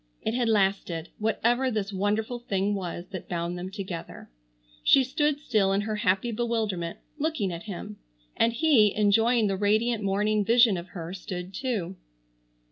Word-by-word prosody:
It 220 - -1
had 240 -1 +1
lasted, 190 -5 0
whatever 235 +4 +1
this 210 -3 -2
wonderful 210 +5 -1
thing 200 -3 -1
was 175 -3 -4
that 185 -3 -7
bound 170 0 -2
them 180 +1 -5
together. 190 - -7 0.5
She 270 - +6
stood 295 +3 0
still 215 -9 +1
in 200 - +2
her 215 0 -3
happy 195 +3 +1
bewilderment, 220 -7 -2 0.2
looking 285 - -1
at 170 +2 -7
him, 170 - -6 0.4
and 230 - +3
he, 230 -5 +4
enjoying 225 +3 +3
the 195 -1 0
radiant 215 +2 +1
morning 210 +2 +1
vision 230 0 +5
of 175 0 -6
her, 170 +1 -5
stood 185 0 -6
too. 195 -7 -3
205 Hz, 155 wpm, -27 LUFS, 190-230 Hz, 0.5 s, She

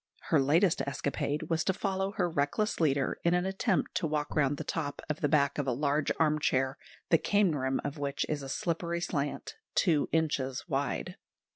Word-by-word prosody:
Her 155 -4 +5
latest 165 +6 +3
escapade 140 +1 -2
was 165 -1 0
to 190 - +2
follow 195 0 -2
her 180 -3 +1
reckless 160 +7 0
leader 140 -4 +1
in 170 +1 +3
an 180 +1 +1
attempt 190 +1 0
to 180 -3 0
walk 150 0 -2
round 145 -2 +2
the - - -4
top 145 0 -3
of 150 - -5
the 145 - +2
back 140 -2 +2
of 140 - -1
a - - +2
large 145 +3 +1
armchair, 150 -4 +1 0.3
the 165 - +6
cane 200 -4 +2
rim 130 -2 0
of 145 +1 -4
which 140 -1 -1
is 150 -2 -2
a 135 - -7
slippery 170 +3 -1
slant, 150 -5 -3 0.2
two 160 -6 +3
inches 145 -4 0
wide. 145 +5 -2
150 Hz, 185 wpm, -30 LUFS, 140-175 Hz, 0.3 s, the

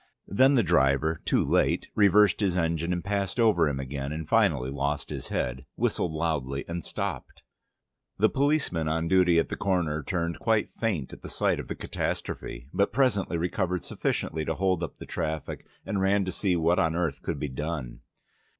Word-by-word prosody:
Then 130 +8 +4
the 120 - +4
driver 75 -1 +2
(too - - +2
late) - - +1
reversed 105 -1 +5
his 95 -4 +1
engine 85 0 0
and 90 -1 -1
passed 100 +1 -2
over 100 -9 +4
him 70 -2 -3
again, 70 +1 -4
and 80 0 -5
finally 65 +2 +2
lost 70 +1 -2
his - - -5
head, 65 +2 -3
whistled 85 - 0
loudly 75 -4 -2
and 85 -1 -4
stopped. - - -5 0.7
The 110 - +5
policeman 135 - +1
on 80 +1 0
duty 90 -1 +4
at 80 - +2
the - - -3
corner 85 -6 0
turned 85 +2 -2
quite 110 -2 +1
faint 95 - -2
at - - -11
the - - -8
sight - - +1
of - - -6
the - - -4
catastrophe, - - -4
but 100 - +2
presently 105 -9 +1
recovered 90 +1 -1
sufficiently 80 0 -2
to 80 - -1
hold 95 +1 +1
up - - -5
the - - -9
traffic, 80 -3 -4 0.2
and 100 - -1
ran 100 0 +2
to 95 - -2
see 95 0 0
what 85 +2 +2
on 80 -3 +1
earth 85 -5 -1
could - - -3
be 75 - -3
done. 75 -1 -4
85 Hz, 185 wpm, -27 LUFS, 75-95 Hz, 0.7 s, reversed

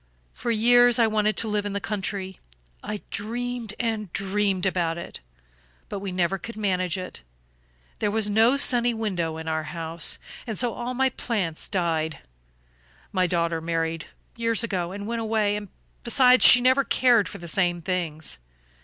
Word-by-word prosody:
For 240 - -5
years 240 +1 +5
I 235 - +5
wanted 215 -1 +1
to 230 - +3
live 210 -1 0
in 205 -1 -4
the 200 - -1
country. 195 -2 -4 0.4
I 210 -1 -5
dreamed 235 +1 -4
and 220 -5 -2
dreamed 195 -1 0
about 170 -3 0
it; 170 - -8 0.7
but 200 - -4
we 195 -1 -5
never 180 +1 0
could 230 +4 -8
manage 185 -4 0
it. 185 - -7 0.8
There 210 - +1
was 215 0 0
no 225 +6 +4
sunny 245 -3 +3
window 175 -8 -2
in 160 0 -7
our 160 -1 -1
house, 165 +1 -3 0.3
and 220 -3 -4
so 240 -1 +1
all 245 +1 -4
my 265 +1 +2
plants 195 -11 -3
died. 165 -4 -1 0.9
My 185 -2 +1
daughter 170 -1 0
married 165 -1 -2 0.3
years 230 0 0
ago 180 -6 -2
and 200 +1 -6
went 230 +1 -3
away 210 -2 0 0.4
besides, 250 +1 +5
she 250 - +9
never 260 +2 +4
cared 240 -3 +3
for - - -8
the 170 - -9
same 175 0 +1
things. 160 - -3
205 Hz, 160 wpm, -25 LUFS, 175-230 Hz, 0.9 s, she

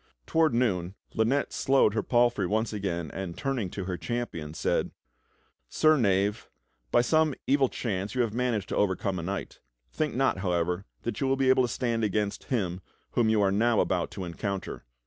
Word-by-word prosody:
Toward 160 -5 +2
noon 95 -7 0 0.2
Lynette 120 +6 +1
slowed 135 -6 +3
her 110 - +1
palfrey 120 -5 +2
once 110 +3 0
again 85 -6 -3
and 95 -3 -5
turning 130 -8 -2
to 95 - -5
her 90 -1 -3
champion 85 -9 -4
said: - - 0 0.8
"Sir 155 0 +4
Knave, 100 -4 +1 0.4
by 120 - +4
some 155 +2 +2
evil 135 -1 +3
chance 100 -1 -3
you 125 - +2
have 115 -3 0
managed 120 -5 -1
to - - -2
overcome 95 -1 0
a - - -3
knight. 95 +4 -5 0.3
Think 155 -5 -2
not, 135 -7 +2
however, 90 0 -1 0.2
that 120 - -3
you 135 - +2
will 135 0 +2
be 135 -1 +2
able 130 0 +5
to - - +1
stand 120 -2 -1
against 105 0 -1
him 95 -8 -1 0.3
whom 115 -2 +2
you 110 -2 +3
are 95 - +3
now 110 +2 +3
about 90 -2 +1
to 95 - -5
encounter. 95 +3 -4
105 Hz, 185 wpm, -28 LUFS, 95-125 Hz, 0.8 s, able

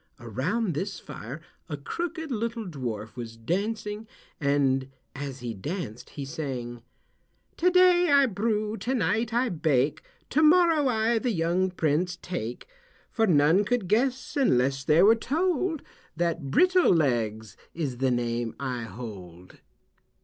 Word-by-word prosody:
Around 160 - -1
this 185 +5 -3
fire 140 +1 -8 0.3
a 150 - -3
crooked 320 - -4
little 230 -1 -2
dwarf 120 - -5
was 115 -2 -7
dancing 210 - -3 0.3
and 140 -3 +1 0.3
as 135 -2 -6
he 120 -2 -4
danced 125 - -6
he 140 - -3
sang: 125 -5 -5 0.8
"To 360 - +4
day 360 -1 +5
I 280 -1 +6
brew, 215 -1 -1
to 260 +4 -2
night 225 0 0
I 240 +2 +1
bake, 150 - +1 0.3
To 305 - +3
morrow 320 -2 +5
I 225 -1 +2
the 250 - -1
young 180 -1 +1
prince 175 +1 0
take, 125 -10 -5 0.4
For 225 -2 +2
none 160 +3 +4
could 225 -2 -1
guess, 250 +6 0
unless 135 - +2
they 155 +5 +4
were 215 +3 +8
told 320 +6 -1 0.3
That 170 -4 -1
Brittle 365 - +4
Legs 110 - 0 0.2
is 145 -7 -3
the 130 +1 +1
name 120 -1 -1
I 125 -4 -3
hold." 95 -7 -10
170 Hz, 135 wpm, -27 LUFS, -, 0.8 s, were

